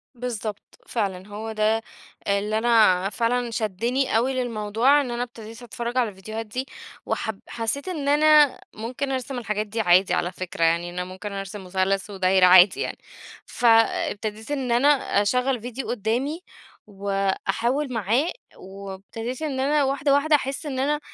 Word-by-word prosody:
بالضبط 225 -4 -6
فعلًا، 195 -4 -3
هو 215 +2 -6
ده 220 +1 +1 0.5
اللي 200 +2 0
أنا 215 -5 +4
فعلًا 240 +2 -1
شدني 230 +4 0
أوي 260 +3 +1
للموضوع 240 +3 +2
إن 255 -4 -4
أنا 240 +1 -1
ابتديت 230 -1 -10
أتفرج 240 +1 -5
على 240 -4 +2
الفيديوهات 215 +3 -7
دي 250 +5 -4 0.4
وحب 220 -3 -3
حسيت 240 +8 -3
إن 305 -6 -3
أنا 300 -1 +5
ممكن 255 +5 -4
أرسم 260 0 -3
الحاجات 210 -1 -2
دي 225 +2 -2
عادي 180 0 +4
على 175 - 0
فكرة، 185 -1 -4
يعني 170 +1 +2
أنا 180 +1 -4
ممكن 190 +3 -7
أرسم 195 +1 -6
مثلث 190 +2 -1
ودايرة 190 -1 +3
عادي 180 +1 +7
يعني، - - -3 0.5
فابتديت 225 -1 +1
إن 265 -4 -2
أنا 245 +5 +4 0.3
أشغل 250 +3 +1
فيديو 245 +2 -6
قدّامي، 245 - -1 0.5
وأحاول 200 +7 -1
معاه، 230 - +1 0.3
وابتديت 195 +6 -7
إن 285 -4 -2
أنا 290 +2 +2
واحدة 275 +1 +1
واحدة 300 +2 +4
أحس 275 +1 -3
إن 265 -3 -3
أنا 295 +2 +1
225 Hz, 150 wpm, -24 LUFS, 200-260 Hz, 0.5 s, عادي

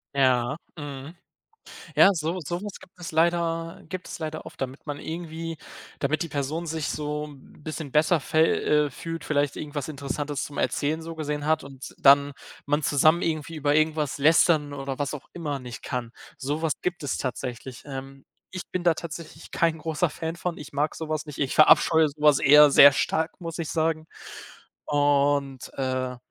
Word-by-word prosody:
Ja, 130 0 +2 0.2
mhm. 145 0 -8 0.8
Ja, 200 - +7
so 165 +2 -2
sowas 180 +6 -5
gibt 180 - -18
es 175 -2 -7
leider 165 0 0
gibt 185 -1 -6
es - - -7
leider 155 -1 -5
oft, - - -11
damit 135 +1 -5
man 145 -1 -4
irgendwie 165 0 -6 0.4
damit 150 +4 0
die 170 - -5
Person 150 +3 -3
sich 160 -1 -3
so 150 0 -3
'n 145 0 -16
bisschen 155 -2 -6
besser 155 +3 +4
fä 155 +2 0 0.5
äh, - - -6
fühlt, 165 +5 -6
vielleicht 145 -2 0
irgendwas 145 -2 -5
Interessantes 145 -1 -4
zum 145 - -9
Erzählen 155 +2 0
so 165 0 -7
gesehen 150 -2 -3
hat 155 0 +1
und 135 -1 -10
dann 140 +1 +6 0.3
man 145 +2 0
zusammen 155 +4 +4
irgendwie 160 0 -2
über 145 -1 +1
irgendwas 155 -2 +1
lästern 155 0 +4
oder 135 -1 -5
was 145 -2 -2
auch 145 - -9
immer 150 -5 -3
nicht 125 -3 -9
kann. 120 -2 -4 0.3
Sowas 150 +3 -1
gibt 175 -2 -3
es 145 - -2
tatsächlich. 125 0 -5
Ähm, 135 -1 -8 0.3
ich 185 -1 -5
bin 180 - -1
da 170 -1 +4
tatsächlich 165 0 -8
kein 165 -1 +1
großer 160 +2 0
Fan 160 +2 -5
von, 170 0 -4
ich 150 - -10
mag 150 +2 0
sowas 155 -1 -3
nicht. 150 -2 -9
Ich 135 -2 -1
verabscheue 160 +1 +6
sowas 150 -1 +3
eher 150 +1 +8
sehr 140 0 +9
stark, 160 +4 -1
muss 165 -1 -6
ich 165 -2 -3
sagen. 160 -1 0 0.8
Und, 145 -2 +1
äh, 130 -1 -2
150 Hz, 175 wpm, -26 LUFS, 140-160 Hz, 0.8 s, sehr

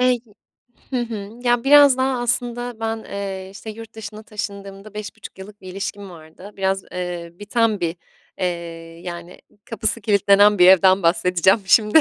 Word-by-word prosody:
Eee, 250 0 +4
y 240 - -6 0.7
Hı 255 - 0
hı. 220 -4 -5
Ya, 240 0 +2
biraz 285 -1 +7
daha 260 -1 0
aslında 245 -1 -2
ben, 225 0 -3
eee, 195 -1 -6
işte, 200 +2 -10
yurt 225 +1 -10
dışına 215 0 -9
taşındığımda 200 -1 -7
5.5 205 -2 -9
yıllık 205 +2 -12
bir 185 - -11
ilişkim 195 +1 -6
vardı. 165 +4 -13
Biraz, 190 0 0
eee, 175 -2 -5
biten 210 +3 0
bir, 170 -1 -2 0.4
eee, 185 - 0 0.6
yani 175 0 -8 0.3
kapısı 225 +1 -2
kilitlenen 205 -1 +4
bir 180 - +8
evden 190 0 +5
bahsedeceğim 180 +4 +3
şimdi. 215 +8 +6
200 Hz, 155 wpm, -21 LUFS, 190-225 Hz, 0.7 s, bir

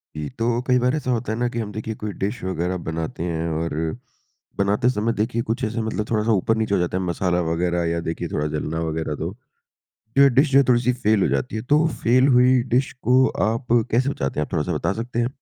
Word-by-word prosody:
जी, 75 -1 -4
तो 115 - -1
कई 125 -1 +4
बार 125 +3 +1
ऐसा 145 -4 -2
होता 115 -2 -1
है 110 - -2
ना 120 - +1
कि 120 - -4
हम 105 -2 -4
देखिए 110 +1 -4
कोई 105 -1 -3
डिश 100 +3 -3
वगैरह 90 0 -2
बनाते 80 0 -4
हैं 85 -1 -2
और 80 +1 -2 0.8
बनाते 105 +5 +2
समय 115 -1 0
देखिए 115 +2 -1
कुछ 120 +3 -1
ऐसे 115 +1 -2
मतलब 110 -1 -3
थोड़ा-सा 110 0 +1
ऊपर-नीचे 110 +1 +1
हो - - +1
जाता 90 +1 -1
है 95 - -2
मसाला 90 0 0
वगैरह 85 +1 0
या 85 - -1
देखिए 85 +1 -3
थोड़ा 75 0 0
जलना 75 +1 -2
वगैरह 80 -1 -2
तो, 80 +5 -4 0.8
जो 140 - +7
ये 140 - +8
डिश 140 +1 +4
जो 135 - +7
है, 140 - +5
थोड़ी-सी 125 0 +3
फ़ेल 110 -4 +1
हो - - +2
जाती 125 - -2
है, 110 - -3
तो 150 +6 +3 0.2
फ़ेल 125 +3 +4
हुई 125 0 +5
डिश 130 +2 +1
को 130 +3 +4 0.2
आप 115 +3 -3 0.2
कैसे 125 +4 +2
बचाते 70 - -2
हैं, 75 - -1
आप - - -23
थोड़ा-सा 85 0 -1
बता 75 - 0
सकते 120 0 -6
हैं? 120 - +1
110 Hz, 235 wpm, -22 LUFS, 85-125 Hz, 0.8 s, ये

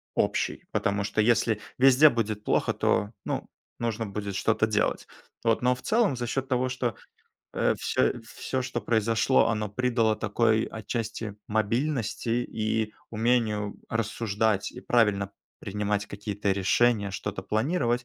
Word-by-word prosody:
общей, - - 0
потому 100 0 0
что, 100 - -3
если 110 -1 +2 0.2
везде 135 +3 +7
будет 110 -4 -2
плохо, - - +1
то, 105 - +1
ну, - - -3 0.3
нужно 115 -1 -2
будет 100 -1 -5
что-то 110 +2 +2
делать. 105 -1 0 0.4
Вот, 115 -1 +2
но 125 +1 +3
в 125 - -13
целом, 220 - +2
за 120 -1 -3
счёт 135 +3 -2
того, 130 -1 +1
что, 125 -3 -2 0.6
э, - - +2
всё - - +1
всё, 130 +3 -4
что 120 -1 -3
произошло, 110 +1 +2
оно 105 -2 -1
придало 115 -1 +1
такой 110 +1 +2
отчасти 110 -1 -4
мобильности 115 +1 0
и 110 0 -1 0.2
умению 110 -2 +1
рассуждать 110 -2 0
и - - -9
правильно 105 -4 +2 0.3
принимать 105 +1 -2
какие-то 100 0 -3
решения, 100 +2 +2
что-то 95 0 -4
планировать, 120 - 0
110 Hz, 135 wpm, -27 LUFS, 105-120 Hz, 0.6 s, везде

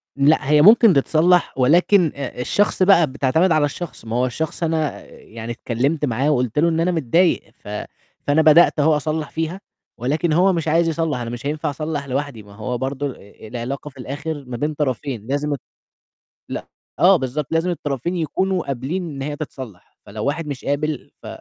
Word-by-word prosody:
لأ 140 0 +3
هي 150 0 +5
ممكن 215 +3 +7
تتصلّح 165 +5 +3
ولكن، 170 +6 +4
آآ، 140 -3 -5
الشخص 200 +8 +1
بقى 185 -4 +5
بتعتمد 145 +6 +1
على 155 -2 +4
الشخص 150 -3 -7
ما 110 +1 -4
هو 125 +1 +2
الشخص 160 +7 -3
أنا 160 -2 -1
يعني 115 +1 -9
اتكلّمت 135 +6 -1
معاه 135 +3 0
وقُلت 125 -1 0
له 170 +3 +4
إن 165 -1 0
أنا 175 +2 +2
متضايق 165 +2 +2 0.2
ف - - -14 0.6
فأنا 145 +2 +4
بدأت 155 +1 +5
أهو 155 +1 +4
أصلّح 155 +1 -2
فيها، 165 +4 -4 0.4
ولكن 150 +7 0
هو 185 +4 +4
مش 165 -2 -2
عايز 165 +2 +3
يصلّح 160 -4 -1
أنا 120 -1 -4
مش 120 +2 -7
هينفع 150 +1 -2
أصلّح 150 0 -4
لوحدي 135 -4 -3
ما 100 0 -15
هو 110 +4 -3
برضه 135 +2 -3
آآ 100 +2 -15
العلاقة 125 +5 -5
في 140 - -20
الآخِر 145 +3 -5
ما 125 -1 -5
بين 150 +5 -1
طرفين 130 -5 -3
لازم 145 +2 -1
الط 140 - -5 0.9
لأ. - - -6 0.3
آه، 190 +2 +6
بالضبط، 135 0 -3
لازم 165 +2 +1
الطرفين 155 +1 -3
يكونوا 180 +3 -1
قابلين 140 +8 -3
إن 135 -2 -6
هي 145 +1 -4
تتصلّح، 130 - -9
فلو 105 +1 -6
واحد 150 +3 -2
مش 140 -3 -6
قابل 145 0 -2
ف - - -11
150 Hz, 185 wpm, -21 LUFS, 130-165 Hz, 0.9 s, ممكن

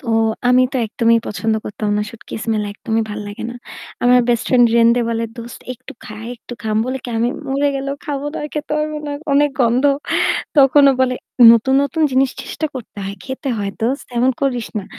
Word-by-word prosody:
তো, 255 - -15 0.4
আমি 250 +1 +5
তো - - -1
একদমই 230 +1 +2
পছন্দ 220 +1 -1
করতাম 210 0 -4
না। - - +1
শুটকি 230 - -11
স্মেল 220 -2 0
একদমই 225 +2 -2
ভাল 210 - -5
লাগে 205 0 -7
না। - - -8 0.5
আমার 250 +1 +6
বেস্ট 235 -2 +1
ফ্রেন্ড 245 -2 +5
রেন্দে 235 +1 +5
বলে, 230 0 -1
"দোস্ত 235 0 -9
একটু 245 - -12
খা, 215 - -9 0.2
একটু 245 - -12
খা।" 215 -1 -1
আমি - - 0
বলি 260 +1 -2
কি, - - -6
"আমি 235 - +2 0.2
মরে 280 +2 +1
গেলেও 275 +1 -3
খাবো 285 -2 -3
না, - - -6
আর 300 - -4
খেতে 300 0 -4
পারব 305 0 -2
না। 290 - -3 0.2
অনেক 290 +1 +4
গন্ধ।" 245 +2 +2 0.7
তখন 280 +1 +6
ও - - +3
বলে, 255 -1 +2 0.4
"নতুন, 235 +3 +4
নতুন 315 +3 -1
জিনিস 260 0 +3
চেষ্টা 315 - -3
করতে 250 -5 -9
হয়, 195 +1 -5
খেতে 265 +1 -5
হয় 200 -1 -2
দোস্ত। 250 +6 -1
এমন 255 +2 +4
করিস 250 -5 0
না। 200 - -6
245 Hz, 210 wpm, -18 LUFS, 225-270 Hz, 0.7 s, আমার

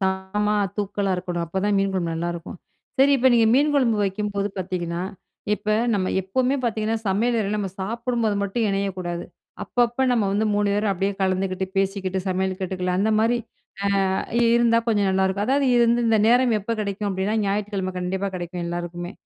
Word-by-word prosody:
காரமா 190 +2 0 0.2
தூக்கலா 200 -1 -1
இருக்கணும். 175 -1 -3
அப்பதான் 190 +4 0
மீன் 195 0 +1
குழம்பு 170 -3 -1
நல்லாருக்கும். 170 +1 -4 0.4
சரி, 280 +1 +6
இப்ப 260 0 +4
நீங்க 230 -2 +5
மீன் 290 +3 +3
குழம்பு 245 -6 +3
வைக்கும்போது 200 +1 -2
பாத்தீங்கன்னா, 175 -2 -3 0.5
இப்ப 210 - -15 0.3
நம்ம 185 -2 0
எப்போமே 255 +8 0
பாத்தீங்கன்னா 220 -1 0
சமையலறையில 210 +1 +1
நம்ம 195 -2 -2
சாப்பிடும்போது 230 +1 -1
மட்டும் 200 +4 -1
இணையக்கூடாது. 185 -3 -2 0.4
அப்பப்ப 240 +1 +1
நம்ம 225 -4 +2
வந்து 210 +2 +1
3 205 0 +1
பேரும் 210 0 +1
அப்டியே 195 +2 -1
கலந்துக்கிட்டு, 190 0 0
பேசிக்கிட்டு, 195 -1 0
சமையல் 190 0 -1
காட்டுக்குள்ள 185 -1 -2
அந்தமாரி 220 +3 +2 0.7
அ - - 0 0.4
இருந்தா 235 -1 +4
கொஞ்சம் 205 -3 +2
நல்லாருக்கும். 190 +1 +1
அதாவது 275 +1 +2
இருந்த 235 0 +3
இந்த 225 -1 +3
நேரம் 245 0 +4
எப்போ 230 +4 -2
கிடைக்கும் 205 0 -2
அப்டின்னா, 190 +3 -1
ஞாயிற்றுக்கிழம 200 -2 -2
கண்டிப்பா 190 +2 -2
கிடைக்கும் 175 0 -5
எல்லாருக்குமே. 175 +1 -5
200 Hz, 155 wpm, -23 LUFS, 190-225 Hz, 0.7 s, சரி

